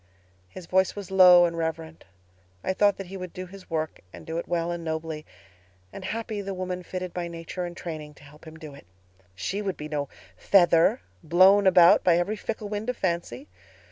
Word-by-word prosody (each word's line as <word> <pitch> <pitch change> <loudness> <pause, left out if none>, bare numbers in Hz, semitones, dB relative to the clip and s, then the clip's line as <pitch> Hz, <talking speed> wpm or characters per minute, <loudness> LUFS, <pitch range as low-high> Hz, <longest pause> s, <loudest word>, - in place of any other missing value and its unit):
"His 180 - -10
voice 190 +2 +1
was 200 -2 -8
low 180 -2 +8
and 170 -1 -2
reverent. 160 -1 -5 0.6
I 190 - -1
thought 205 +1 +2
that 195 - -6
he 190 +2 -8
would 185 -2 -8
do 185 - -6
his 190 +1 -14
work 160 -1 -3
and - - -12
do 165 +1 -3
it - - -7
well 170 -1 -1
and 170 -1 -5
nobly; 160 -1 -5 0.7
and 195 - -8
happy 220 0 -4
the 195 -1 -5
woman 180 0 -4
fitted 185 0 -6
by 175 -1 -3
nature 170 +2 -6
and 175 0 -8
training 155 -3 -7
to - - -18
help 150 +2 -16
him 160 0 -11
do 155 -3 -10
it. 140 - -15 0.5
She 195 - -3
would 195 -3 -3
be 150 - -6
no 145 -2 -3 0.3
feather, 170 - +4 0.2
blown 190 +4 +5
about 175 -2 +6
by 175 -2 +4
every 185 +5 -1
fickle 215 +1 -5
wind 210 +3 -4
of 250 - -2
fancy. 180 +10 -3
175 Hz, 205 wpm, -26 LUFS, 165-190 Hz, 0.7 s, low